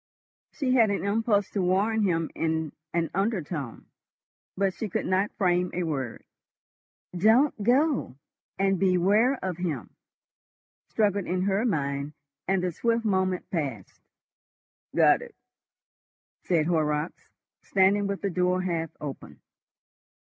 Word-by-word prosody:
She 270 -4 -1
had 230 -4 +5
an 200 -1 -1
impulse 205 -1 +1
to 200 - -1
warn 200 +5 +2
him 165 -5 0
in 160 -2 -1 0.2
an 165 -1 -1
undertone, 175 - -2 0.7
but 195 -1 +1
she 220 - -5
could - - -2
not 190 +2 +1
frame 180 -2 +2
a 180 - 0
word. 135 -7 -4 0.9
"Don't 225 - +4
go!" 265 - +2 0.4
and 195 -1 +1
"Beware 195 +8 +3
of 180 -3 -3
him!" 155 - -4 1.0
struggled 205 -3 +1
in 180 +1 0
her 200 +4 +1
mind, 140 -5 -2 0.3
and 190 -1 +1
the 180 - 0
swift 230 +6 0
moment 185 -3 0
passed. 135 - -4 0.9
"Got - - +5
it?" - - -11 1.1
said 165 -4 +2
Horrocks, 155 -1 -1 0.3
standing 200 +1 +2
with 200 0 -4
the 200 - 0
door 180 +1 +1
half 165 -3 -2
open. 145 -2 -8
185 Hz, 125 wpm, -27 LUFS, 165-205 Hz, 1.1 s, had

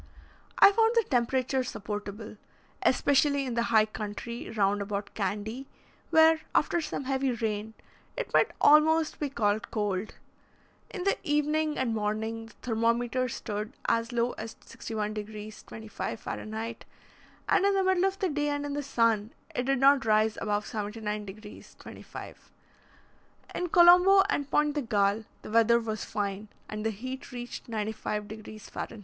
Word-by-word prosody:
I - - +9
found 450 +2 +3
the 465 - +4
temperature 255 +1 +1
supportable, 210 -2 -6 0.4
especially 280 +1 +3
in 250 - -3
the 235 - +1
high 220 -2 +5
country 215 +2 -6
round 205 -1 +1
about 200 0 -4
Candy, 215 +6 -3 0.4
where, 320 0 +5
after 345 - +2
some 305 - -4
heavy 265 -1 0
rain, 220 -1 -3 0.4
it - - -4
might - - +4
almost 310 +1 +5
be 295 - -1
called 220 -3 0
cold. 205 -2 -2 0.7
In 370 - -5
the 395 - +2
evening 300 +1 0
and 250 -3 0
morning 220 +1 -2
the 225 - -17
thermometer 235 +2 0
stood 215 +1 -5
as 230 +1 +1
low 240 0 +1
as 220 0 -6
61 215 -2 -4
degrees 215 0 -7
25' 220 0 -6
Fah.; - - -6
and 220 +2 -5 0.9
in 400 0 +4
the 385 - +2
middle 375 0 +3
of 390 0 0
the 380 - 0
day 295 -1 -1
and 290 0 -2
in 285 - -3
the 290 - -2
sun, 230 -5 +1 0.2
it 250 +1 -2
did 275 0 +2
not 275 +1 +5
rise 215 0 +3
above 210 0 -1
79 210 -1 -4
degrees 210 +2 -11
25'. - - -11 1.0
In 360 - -2
Colombo 360 +3 +7
and 285 -6 -1
Pointe 295 0 +2
de 295 - -1
Galle, 210 -2 +1 0.2
the - - -8
weather 230 +1 +5
was 220 -2 -4
fine, 205 0 -3 0.2
and 210 0 -5
the 225 - +1
heat 255 +6 -7
reached 245 -1 -7
95 215 -1 -3
degrees 215 0 -10
Fah. - - -5
230 Hz, 155 wpm, -28 LUFS, 215-280 Hz, 1.0 s, I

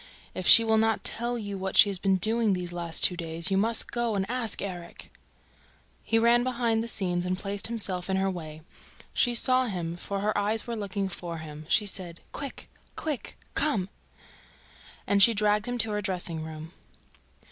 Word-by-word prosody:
If 185 - -3
she 230 - +10
will 220 -1 +3
not 225 0 +1
tell 240 +1 -2
you 205 -3 -5
what 190 0 -3
she - - +8
has 190 - -3
been 195 0 +2
doing 220 +2 +2
the 180 -1 -3
past 175 -1 -2
two 180 - +7
days... 165 +1 -3
you - - +2
must 225 +2 0
go 235 -2 -1
and 190 -1 0
ask 245 -4 -1
Erik!" 175 -3 -7 0.9
He 225 - +1
ran 235 +1 +4
behind 235 -3 0
the - - -5
scenes 180 -5 -1
and 180 0 -2
placed 200 +1 -2
himself 195 -6 -2
in 190 - +1
her 190 0 +1
way. 155 -3 -8 0.5
She 245 -1 +2
saw 255 +1 +3
him 170 -5 -4
for 195 +3 -5
her 210 +1 0
eyes 210 +2 0
were 235 - -4
looking 200 -2 -3
for 175 -2 -6
him. 155 -1 -9
She 210 - +3
said: 180 -4 -3
"Quick! 280 -2 -7 0.3
Quick!... 300 -6 -5 0.2
Come!" 210 -12 0 1.2
And 200 0 +2
she 230 +3 +6
dragged 210 +1 +1
him 245 0 -2
to 225 -2 +2
her 210 0 -1
dressing 180 -5 -2
room. 160 0 -8
200 Hz, 190 wpm, -27 LUFS, 180-225 Hz, 1.2 s, she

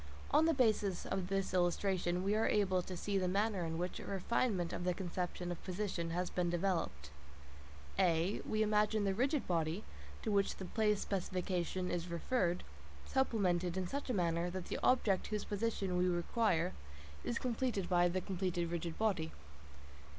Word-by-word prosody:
On 315 - +5
the 330 - +4
basis 215 -7 +2
of 190 -2 -2
this 195 -1 -1
illustration, 180 0 +1
we 200 +2 +2
are 220 +1 +2
able 190 -3 +2
to 180 0 -6
see 200 +2 0
the 185 - 0
manner 200 0 +1
in 165 0 -3
which 180 +2 -3
a - - -7
refinement 195 -2 0
of - - -3
the 180 -1 +1
conception 180 -1 -3
of 175 - -6
position 185 -3 -2
has 175 +2 -1
been 180 -1 0
developed. 170 - -1 0.9
(a) 175 +1 +2
We 215 0 +1
imagine 210 0 +2
the 195 -1 +2
rigid 270 +7 +1
body, 165 +3 0 0.4
to 220 - 0
which 200 -1 +2
the 190 - -6
place 210 +1 +1
specification 185 -1 -1
is 175 0 -2
referred, 175 +1 0 0.4
supplemented 185 -9 +1
in 185 - 0
such 275 +9 -4
a - - +1
manner 170 -1 +1
that 185 0 -5
the - - -2
object 210 -7 +3
whose 210 -1 -2
position 205 -3 -1
we 180 0 +3
require 180 0 +1 0.5
is 235 - -1
reached 235 -6 0
by. 175 -1 +4
the 185 +2 -1
completed 180 -3 -1
rigid 170 -1 -3
body. 185 -8 +1
185 Hz, 170 wpm, -36 LUFS, 175-210 Hz, 0.9 s, On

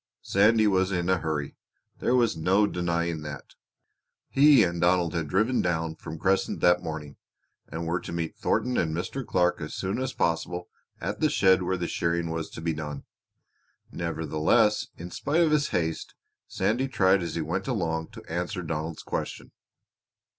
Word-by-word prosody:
Sandy 110 +3 +4
was 95 -2 +2
in 90 -1 -1
a 95 - +2
hurry 75 -3 -3 0.4
there 125 - +2
was 120 -6 +3
no 95 +6 +3
denying 85 -3 -1
that! 75 -2 -8 0.8
He 140 -3 +6
and 85 -1 -1
Donald 90 -1 +3
had 85 -3 -2
driven 110 - +2
down 80 -2 -1
from 80 - -8
Crescent 95 +4 +1
that 90 0 +4
morning, 80 -4 -6 0.5
and 85 +1 -5
were 85 +2 0
to - - -8
meet 85 -1 -3
Thornton 125 0 0
and 80 -2 0
Mr. 130 +10 -3
Clark 90 -5 +1
as 75 - -5
soon 95 +5 -2
as 130 0 -2
possible 85 +1 -1 0.3
at 100 +5 -4
the 155 - +3
shed 95 - +4
where 95 +1 -1
the 85 - -2
shearing 85 0 -1
was 80 -1 -3
to - - -9
be 80 0 -1
done. 75 -2 -6 0.9
Nevertheless, 85 +6 +1
in 90 +1 -8
spite 150 - 0
of 165 -2 +3
his 150 -1 +3
haste, 80 -2 -2 0.3
Sandy 115 +8 0
tried 95 -6 +3
as 85 - -4
he 85 - -1
went - - -3
along 80 -1 -1
to - - -11
answer 90 +2 -3
Donald's 80 0 -4
question. - - -5
85 Hz, 170 wpm, -27 LUFS, 80-100 Hz, 0.9 s, He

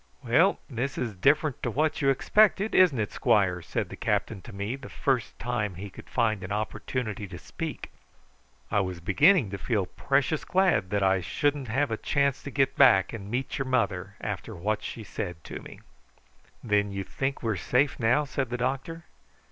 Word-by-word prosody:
"Well, 165 +12 +4
this 130 0 -3
is 120 -4 -2
different 145 - +2
to - - -1
what 155 +6 0
you 135 - +3
expected; 210 +9 +3
isn't 180 -8 +5
it, 105 - -1
squire?" 90 -4 +2
said - - -3
the - - -7
captain 105 -4 -1
to - - -11
me 100 +5 -3
the 135 -2 -10
first 130 -4 -1
time 110 -6 -2
he 100 +2 -7
could - - -13
find 110 -5 0
an 95 - -6
opportunity 110 0 -3
to 90 -1 -8
speak. 155 - -6 0.8
"I 105 - +3
was 95 -3 -2
beginning 130 - +4
to 100 - -5
feel 105 -1 0
precious 140 - 0
glad 185 - +2
that 100 0 0
I 95 -1 +3
shouldn't 145 - -1
have 135 +4 0
a 110 - -1
chance 140 +1 0
to - - -7
get 135 -1 +1
back 120 -9 +5
and 100 -3 -7
meet 125 +5 -2
your 135 - -2
mother 100 -7 0
after 105 +1 -5
what 105 +5 -1
she 115 - -6
said 90 -6 -6
to - - -7
me." - - -12 0.8
"Then 105 -2 +1
you 100 0 -3
think 135 +8 -3
we 115 - +1
are - - -1
safe 125 +9 +1
now?" 120 +5 +3
said 135 -3 -2
the 125 - -2
doctor. 135 +7 -3
120 Hz, 190 wpm, -27 LUFS, 100-140 Hz, 0.8 s, isn't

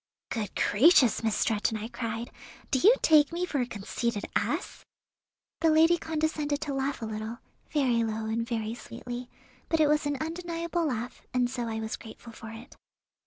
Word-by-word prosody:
"Good 220 -4 -3
gracious, 255 - +5
Miss 220 -2 +1
Stretton," 220 0 +1
I 215 +1 -5
cried, 230 -1 -4 0.4
"do 265 - +3
you 440 - +7
take 300 -3 +6
me 345 +2 -1
for 295 -6 -2
a 245 - -1
conceited 210 0 -3
ass?" - - -1 0.8
The 325 0 +4
lady 325 +2 +5
condescended 305 -2 -1
to 290 - -2
laugh 270 -2 -2
a - - -1
little, 220 +1 -5 0.3
very 250 -6 +2
low 220 0 -2
and 225 +1 -1
very 225 -2 -2
sweetly, 245 +1 -7 0.4
but 325 - +2
it 310 - +6
was 300 0 +2
an 290 -1 -1
undeniable 335 +1 -2
laugh, 245 -2 -4
and 250 -1 +3
so 245 -2 -3
I 220 -1 -3
was 220 0 -3
grateful 230 +1 -11
for 220 - -9
it. 225 +3 -11
245 Hz, 175 wpm, -28 LUFS, 225-310 Hz, 0.8 s, you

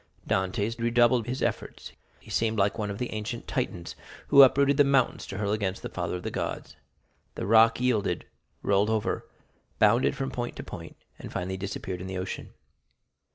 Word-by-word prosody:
Dantès 100 +5 -1
redoubled 120 0 +3
his 130 +2 -2
efforts; - - -3 0.3
he - - -14
seemed 110 -1 +1
like 100 +2 +1
one 105 -1 -2
of 100 - -4
the 125 0 -4
ancient 110 +2 -5
Titans, 85 -1 -3 0.3
who 140 -1 +9
uprooted 140 +1 +5
the 145 - +7
mountains 135 -3 +1
to 100 - -6
hurl 105 -1 -1
against 100 -3 -2
the - - -4
father - - -3
of 90 - -6
the - - -3
gods. - - -4 0.6
The - - -4
rock 115 +3 +5
yielded, 110 -8 0 0.4
rolled 100 +1 +2
over, 110 -2 -1 0.5
bounded 110 +4 +4
from 135 0 -3
point 120 -1 -4
to - - -7
point, - - -9 0.2
and - - -8
finally 95 +1 -3
disappeared 95 -1 -5
in 95 - -6
the 95 0 -4
ocean. 95 +1 -5
110 Hz, 180 wpm, -27 LUFS, 100-120 Hz, 0.6 s, who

